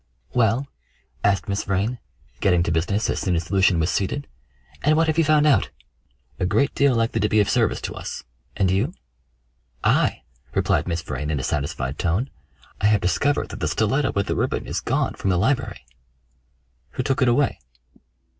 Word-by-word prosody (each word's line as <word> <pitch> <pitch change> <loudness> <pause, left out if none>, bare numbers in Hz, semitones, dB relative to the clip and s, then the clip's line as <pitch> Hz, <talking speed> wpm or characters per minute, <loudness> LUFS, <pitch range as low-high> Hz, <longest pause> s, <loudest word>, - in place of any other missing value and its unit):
"Well?" 120 +3 +2 0.6
asked 100 +2 +2
Miss 100 0 -1
Vrain, 100 +6 -1 0.4
getting 90 -3 +3
to 85 - -1
business 95 +7 0
as - - -1
soon 90 -3 0
as 80 +1 -3
Lucian 95 -3 +3
was 80 +2 +1
seated, 140 +9 -1 0.6
"and 155 +2 +3
what 165 - +4
have 160 0 +1
you - - +5
found 155 0 +4
out?" 135 -10 +3 0.7
"A - - +1
great 140 +8 +2
deal 140 -3 +3
likely 115 0 +1
to 105 - +1
be 110 - +3
of 105 - +3
service - - +1
to - - -4
us. - - -6 0.3
And 95 -3 +2
you?" 120 - 0 0.9
"I!" - - +2 0.3
replied - - +1
Miss 85 -1 -2
Vrain 75 -3 -4
in 75 -3 -1
a - - -4
satisfied 70 -2 -2
tone. 95 +10 0 0.5
"I 100 - +4
have 105 -2 +3
discovered 140 +12 +1
that - - -7
the 75 - -1
stiletto 110 - +1
with 100 0 0
the - - -2
ribbon - - -1
is - - -3
gone - - 0
from 95 - -3
the 90 - +2
library." 115 - 0 1.1
"Who 130 - -2
took 135 +1 0
it 130 - +4
away?" 130 +4 +2
100 Hz, 185 wpm, -23 LUFS, 90-130 Hz, 1.1 s, you